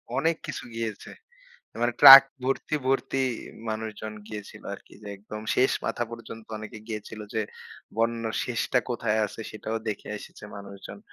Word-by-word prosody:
অনেক 165 0 +2
কিছু - - -5
গিয়েছে। 115 -3 -4 0.7
মানে 120 0 +2
ট্রাক 135 0 +14 0.2
ভর্তি, 135 +3 -1
ভর্তি 135 0 +1 0.5
মানুষজন 110 -1 -4
গিয়েছিল 105 -1 -8
আরকি। - - -15
যে, 105 - -8
একদম 105 +2 -8
শেষ 130 +1 +4 0.2
মাথা 120 - -1
পর্যন্ত 115 -1 -9
অনেকে 110 +1 -8
গিয়েছিল 110 -1 -6
যে, 110 - +1 0.5
বন্যার 115 -1 0
শেষটা 125 +1 0
কোথায় 115 -2 0
আছে? 105 - -10
সেটাও 110 +1 -4
দেখে 105 - -4
এসেছে - - -12
মানুষজন। 100 - -9
110 Hz, 140 wpm, -27 LUFS, 105-120 Hz, 0.7 s, ট্রাক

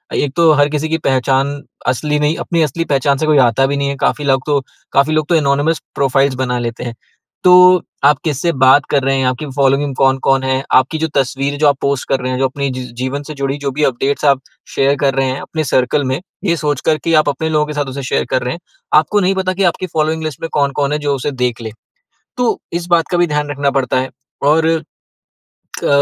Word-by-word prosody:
एक 145 -2 -1
तो 165 -2 +5
हर 145 0 +3
किसी 150 +1 -2
की 160 - +1
पहचान 135 0 0 0.3
असली 150 +4 0
नहीं 150 +2 +1
अपनी 170 -2 -1
असली 160 +3 -2
पहचान 140 -1 +1
से 155 - -1
कोई 155 -2 +3
आता 125 +3 +1
भी 140 +1 -2
नहीं 140 0 -1
है। 140 - -3
काफ़ी 150 - 0
लग 135 -2 +2
तो 145 -2 +1 0.5
लोग 155 -1 0
तो 175 - +3
एनॉनिमस 145 +1 +1
प्रोफ़ाइल्स 135 0 +1
बना 125 -1 -1
लेते 120 0 -4
हैं। 120 -1 -6 0.5
तो 180 -1 +7 0.2
आप 145 0 +5
किससे 155 +2 0
बात 130 +2 +4
कर 140 -2 +2
रहे 135 0 +1
हैं, 130 - 0
आपकी 130 +4 -2
फ़ॉलोइंग 140 0 +1
कौन-कौन 135 0 +2
है, 130 0 0
आपकी 130 +5 +3
जो 160 - 0
तस्वीर 140 +1 -1
जो 150 - +4
आप 140 -2 +3
पोस्ट 140 -1 -1
कर 135 - +1
रहे 130 0 -2
हैं, 125 - -2
जो 135 - +2
अपने 140 +1 -3
जीवन 130 +2 -5
से 155 - -8
जुड़ी 135 0 -1
जो 140 -1 -2
भी 150 +3 -2
अपडेट्स 135 +3 -1
आप 140 -2 +3 0.3
शेयर 140 +1 +2
कर 140 -1 +2
रहे 135 - +1
हैं 130 +1 -3
अपने 160 -1 -4
सर्कल 130 +3 +1
में, 130 +2 -1 0.2
ये 170 -4 +1
सोचकर 150 +1 0
कि 165 - +1
आप 150 - -2
अपने 160 +3 -2
लोगों 150 -1 +1
के 150 - -5
साथ 145 -1 -1
उसे 140 - -5
शेयर 125 - -1
कर 130 - +1
रहे 125 - -2
हैं, 170 - -8 0.4
आपको 160 +7 0
नहीं 190 +1 +1
पता 190 -1 -1
कि 195 +1 -1
आपकी 185 +2 -6
फ़ॉलोइंग 160 0 -1
लिस्ट 155 -4 -5
में 165 - -4
कौन-कौन 140 0 0
है 150 - -1
जो 145 -1 -1
उसे 140 +2 -3
देख 120 -1 -1
ले। 110 -1 -6 0.7
तो 245 -2 0
इस 170 0 -3
बात 170 -2 +3
का 175 - +1
भी 175 0 +3
ध्यान 150 -1 -2
रखना 140 -1 0
पड़ता 130 -2 0
है। 130 0 -3 0.4
और 160 +2 +3 1.2
अ, - - +1
140 Hz, 235 wpm, -16 LUFS, 135-155 Hz, 1.2 s, तो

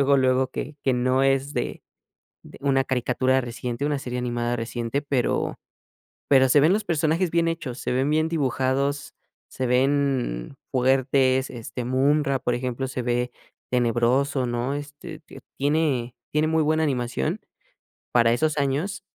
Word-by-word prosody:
luego, 140 0 +4
luego, 130 0 +2
que 150 - -6
que 130 - +2
no 130 +2 +2
es 135 +1 +1
de - - -3 0.6
de - - -13
una 135 -1 +2
caricatura 130 +1 +1
reciente, 120 +2 -4
una 145 -1 0
serie 125 -2 -4
animada 120 -1 -1
reciente, 120 +4 -3
pero 135 -4 -1 0.7
pero 130 -1 +6
se 145 +3 +5
ven 155 +5 +5
los 215 +1 0
personajes 165 +2 +1
bien 170 0 +2
hechos, 140 -7 -3
se - - -3
ven 130 +2 +1
bien 155 +1 +2
dibujados, 140 -1 -1 0.4
se 130 - -3
ven 130 - +1 0.2
fuertes, 130 0 +2
este 120 0 -6
Munra, 140 +2 +2
por 125 -1 -1
ejemplo, 125 +1 -2
se 130 -1 -4
ve 125 0 -1 0.4
tenebroso, 125 +3 +2
¿no? 120 +3 -2
Este, 145 +1 -8
te - - -13 0.2
tiene 140 -4 0 0.2
tiene 150 +1 +2
muy 160 0 +2
buena 155 +1 +2
animación, 120 - -1 0.7
para 115 -1 +4
esos 155 +4 +1
años 140 +9 -1
130 Hz, 150 wpm, -24 LUFS, 125-145 Hz, 0.7 s, pero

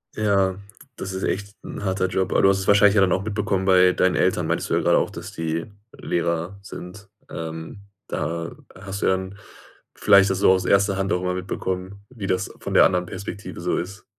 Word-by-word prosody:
Ja, 100 -3 +1 0.4
das 95 0 -5
ist 95 - -4
echt 100 +1 -3
'n 105 - -7
harter 95 -1 0
Job, 95 0 -1
aber - - +3
du 95 - +6
hast 95 - +2
es 95 - -5
wahrscheinlich 100 0 +6
ja 100 - +5
dann 95 -1 +3
auch 95 - -1
mitbekommen 100 -2 -1
bei 90 -1 +5
deinen 90 0 +2
Eltern - - +1
meintest - - -1
du - - 0
ja - - +2
grade - - +3
auch, - - +1
dass - - -8
die 80 0 -3 0.3
Lehrer 85 +2 -2
sind. 100 +1 -10 0.2
Ähm, 80 +5 -7 0.2
da 85 +2 -3 0.2
hast 100 +1 -7
du - - +1
ja - - +4
dann 95 +2 -7 0.6
vielleicht 100 -1 +5
das 95 -1 -1
so 95 - +5
aus 95 -1 +2
erster 100 0 +3
Hand 95 +1 0
auch 90 - 0
immer 90 0 -1
mitbekommen, 95 +1 -4
wie 110 -6 -6
das 95 - -1
von - - -5
der - - +7
anderen 90 -1 +1
Perspektive 95 -1 -7
so 90 - 0
ist. 100 +3 -6
95 Hz, 215 wpm, -23 LUFS, 90-100 Hz, 0.6 s, der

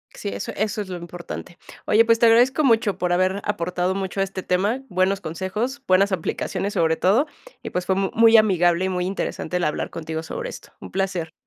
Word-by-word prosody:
Sí, - - -5
eso 100 0 -5
eso 215 +1 -1
es 200 - -7
lo 180 - -4
importante. 175 0 -8 0.3
Oye, 220 +2 +5
pues, 230 0 +4
te 235 - +5
agradezco 245 +6 +5
mucho 225 -6 +3
por 180 -1 -1
haber 185 +2 +1
aportado 180 -1 -1
mucho 195 0 -4
a - - +4
este 195 -1 -5
tema, 205 +8 0
buenos 190 +1 +1
consejos, 210 - -3
buenas 195 +2 +4
aplicaciones 190 +2 -2
sobre 160 -1 +2
todo 215 - +2 0.3
y, - - -6
pues, 180 0 -2
fue 190 - +1
muy 225 +4 +5
amigable 180 -4 +3
y - - 0
muy 180 -1 -1
interesante 180 -2 -3
el 180 - -2
hablar 150 - -2
contigo 160 -1 -5
sobre - - -5
esto. - - -11
Un - - -10
placer. 185 -4 -2
190 Hz, 205 wpm, -23 LUFS, 180-215 Hz, 0.3 s, Oye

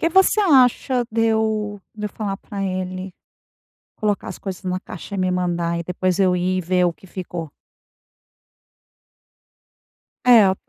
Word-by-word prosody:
que 330 - +3
você 380 +4 +4
acha 260 - +4
de 225 0 +1
eu 215 -2 0
de 210 -1 -7
eu - - -3
falar 200 -2 -4
pra 200 0 -6
ele, 185 0 -3 0.9
colocar 210 -2 -1
as - - -8
coisas 190 -1 -6
na 185 0 -1
caixa 185 +2 -8
e - - -4
me 185 -1 +1
mandar 175 -2 0
e 170 - -3
depois 180 +1 -1
eu 185 -2 +4
ir 185 +1 0
e - - -2
ver 180 +1 +2
o 175 - +1
que 190 - -18
ficou? 175 -4 -6 2.7
É. 220 -6 +7
190 Hz, 155 wpm, -22 LUFS, 180-215 Hz, 2.7 s, É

